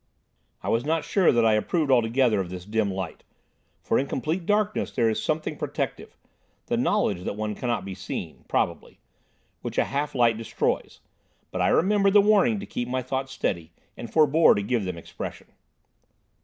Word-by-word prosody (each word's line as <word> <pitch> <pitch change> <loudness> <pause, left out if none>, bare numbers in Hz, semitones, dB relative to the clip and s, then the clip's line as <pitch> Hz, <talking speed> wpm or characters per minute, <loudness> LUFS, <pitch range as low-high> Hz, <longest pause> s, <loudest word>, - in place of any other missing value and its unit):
I - - -2
was 115 +1 +1
not 160 +2 0
sure 195 -3 +3
that 120 -1 +3
I 110 - +5
approved 140 +7 +1
altogether 120 -2 +3
of 90 - -5
this 90 0 -7
dim 105 0 0
light, 95 -3 -5 0.6
for - - +2
in 135 - -1
complete 160 +7 -2
darkness 210 0 +1
there 115 -2 +2
is 110 - -2
something 155 0 -2
protective—the - - -6
knowledge 90 -3 +1
that - - -3
one 105 0 -3
cannot 115 -3 -2
be 100 - -5
seen, - - -6
probably—which - - -5
a - - +3
half 145 +1 -2
light 115 -3 +3
destroys, 115 - -2 0.5
but - - -2
I - - +3
remembered 195 +2 +3
the 210 - +8
warning 215 +2 +3
to - - -6
keep 120 - -4
my 130 +1 -2
thoughts 130 +1 -3
steady, 85 -10 -3 0.2
and 115 - -8
forbore 155 +1 +5
to 100 - -1
give 110 -1 0
them 90 -2 -4
expression. 85 - -8
125 Hz, 170 wpm, -25 LUFS, 105-160 Hz, 0.6 s, the